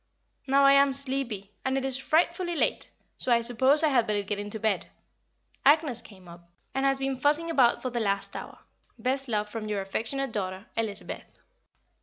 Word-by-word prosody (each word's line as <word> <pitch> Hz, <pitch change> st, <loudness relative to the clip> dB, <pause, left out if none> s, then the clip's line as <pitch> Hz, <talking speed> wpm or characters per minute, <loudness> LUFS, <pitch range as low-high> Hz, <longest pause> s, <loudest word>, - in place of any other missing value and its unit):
Now 275 Hz, +1 st, +4 dB
I 275 Hz, 0 st, +7 dB
am 275 Hz, 0 st, +4 dB
sleepy, 260 Hz, -7 st, -2 dB
and 265 Hz, 0 st, 0 dB
it 270 Hz, -, -2 dB
is 265 Hz, -1 st, 0 dB
frightfully 340 Hz, +4 st, 0 dB
late, -, -, -1 dB, 0.3 s
so 255 Hz, -, -1 dB
I 235 Hz, -1 st, +4 dB
suppose 260 Hz, +6 st, +5 dB
I 310 Hz, -, +4 dB
had 240 Hz, -5 st, +2 dB
better 205 Hz, -1 st, 0 dB
get 200 Hz, +1 st, -4 dB
into 205 Hz, +1 st, -5 dB
bed. 215 Hz, -1 st, 0 dB, 0.8 s
Agnès 285 Hz, -5 st, +3 dB
came 190 Hz, -5 st, -15 dB
up, 170 Hz, 0 st, -14 dB, 0.2 s
and 270 Hz, +1 st, +1 dB
has 270 Hz, 0 st, +2 dB
been 270 Hz, -1 st, -1 dB
fussing 300 Hz, +5 st, +3 dB
about 255 Hz, -6 st, +3 dB
for 255 Hz, -, -3 dB
the 240 Hz, -, -2 dB
last 200 Hz, -3 st, -2 dB
hour. -, -, -8 dB, 0.4 s
Best 265 Hz, +4 st, -1 dB
love 210 Hz, -3 st, -1 dB
from 215 Hz, 0 st, -6 dB
your 210 Hz, -1 st, -2 dB
affectionate 230 Hz, +7 st, -3 dB
daughter, 190 Hz, -1 st, -4 dB
Elizabeth. 220 Hz, -3 st, -4 dB
250 Hz, 185 wpm, -27 LUFS, 210-275 Hz, 0.8 s, I